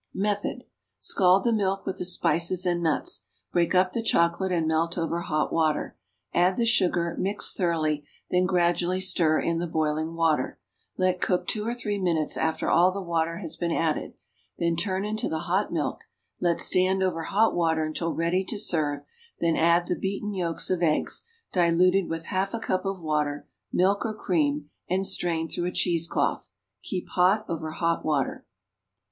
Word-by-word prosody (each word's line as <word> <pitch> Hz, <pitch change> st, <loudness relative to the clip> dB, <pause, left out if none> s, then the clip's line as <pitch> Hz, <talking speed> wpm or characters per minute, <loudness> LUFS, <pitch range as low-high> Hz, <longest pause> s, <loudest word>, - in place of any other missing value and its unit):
Method. 205 Hz, +1 st, -1 dB, 0.4 s
Scald 185 Hz, 0 st, +3 dB
the 235 Hz, -, +2 dB
milk 195 Hz, -2 st, 0 dB
with 190 Hz, -, -4 dB
the -, -, -2 dB
spices 175 Hz, +1 st, +2 dB
and 175 Hz, -1 st, +1 dB
nuts. 160 Hz, -3 st, -1 dB, 0.3 s
Break 175 Hz, +1 st, +1 dB
up 185 Hz, 0 st, +4 dB
the 230 Hz, -, -2 dB
chocolate 175 Hz, -2 st, +2 dB
and 165 Hz, -3 st, +1 dB
melt 165 Hz, +2 st, 0 dB
over 170 Hz, 0 st, -1 dB
hot 155 Hz, -3 st, -1 dB
water; 160 Hz, -2 st, 0 dB, 0.4 s
add 180 Hz, +2 st, +3 dB
the 235 Hz, -, +2 dB
sugar, 180 Hz, -7 st, +2 dB
mix 200 Hz, +2 st, +1 dB
thoroughly, 155 Hz, -5 st, 0 dB, 0.3 s
then 180 Hz, 0 st, +3 dB
gradually 175 Hz, 0 st, +1 dB
stir 170 Hz, -4 st, +2 dB
in 165 Hz, 0 st, 0 dB
the 175 Hz, -, -2 dB
boiling 155 Hz, 0 st, -1 dB
water; 160 Hz, -5 st, +1 dB, 0.4 s
let 185 Hz, -1 st, +1 dB
cook 180 Hz, -1 st, +1 dB
two 215 Hz, 0 st, -2 dB
or 235 Hz, -, -1 dB
three 210 Hz, -4 st, -3 dB
minutes 165 Hz, -5 st, 0 dB
after 160 Hz, 0 st, -1 dB
all 180 Hz, +2 st, +5 dB
the 200 Hz, -, -4 dB
water 165 Hz, -2 st, -1 dB
has 170 Hz, -4 st, -4 dB
been 170 Hz, 0 st, -1 dB
added, 160 Hz, -2 st, -1 dB, 0.4 s
then 170 Hz, 0 st, +1 dB
turn 190 Hz, +3 st, -1 dB
into 215 Hz, +1 st, -2 dB
the 160 Hz, 0 st, -2 dB
hot 185 Hz, +4 st, 0 dB
milk; -, -, -2 dB, 0.4 s
let 170 Hz, -1 st, +1 dB
stand 190 Hz, +1 st, +3 dB
over 175 Hz, -3 st, 0 dB
hot 220 Hz, +3 st, +2 dB
water 160 Hz, -2 st, +1 dB
until 165 Hz, +2 st, -2 dB
ready 170 Hz, +4 st, 0 dB
to 210 Hz, +3 st, -5 dB
serve, 150 Hz, -8 st, 0 dB, 0.4 s
then 165 Hz, -1 st, +2 dB
add 170 Hz, +1 st, +3 dB
the 180 Hz, -, -1 dB
beaten 200 Hz, +2 st, -3 dB
yolks 175 Hz, -3 st, -2 dB
of 180 Hz, -2 st, 0 dB
eggs, 155 Hz, -3 st, +1 dB, 0.3 s
diluted 180 Hz, +1 st, +3 dB
with 165 Hz, 0 st, -3 dB
half 195 Hz, +2 st, -1 dB
a -, -, -3 dB
cup 185 Hz, -3 st, -1 dB
of 195 Hz, -1 st, -2 dB
water, 150 Hz, -3 st, -1 dB, 0.2 s
milk 195 Hz, +3 st, +2 dB
or 220 Hz, -1 st, -3 dB
cream, 150 Hz, -7 st, 0 dB, 0.2 s
and 190 Hz, +1 st, 0 dB
strain 165 Hz, -3 st, 0 dB
through 175 Hz, -, -3 dB
a -, -, -2 dB
cheese 170 Hz, -2 st, +1 dB
cloth. -, -, -1 dB, 0.3 s
Keep 185 Hz, -2 st, -5 dB
hot 190 Hz, +4 st, +3 dB
over 160 Hz, -1 st, -4 dB
hot 165 Hz, +1 st, -1 dB
water. 145 Hz, -4 st, -1 dB
175 Hz, 175 wpm, -26 LUFS, 165-190 Hz, 0.4 s, all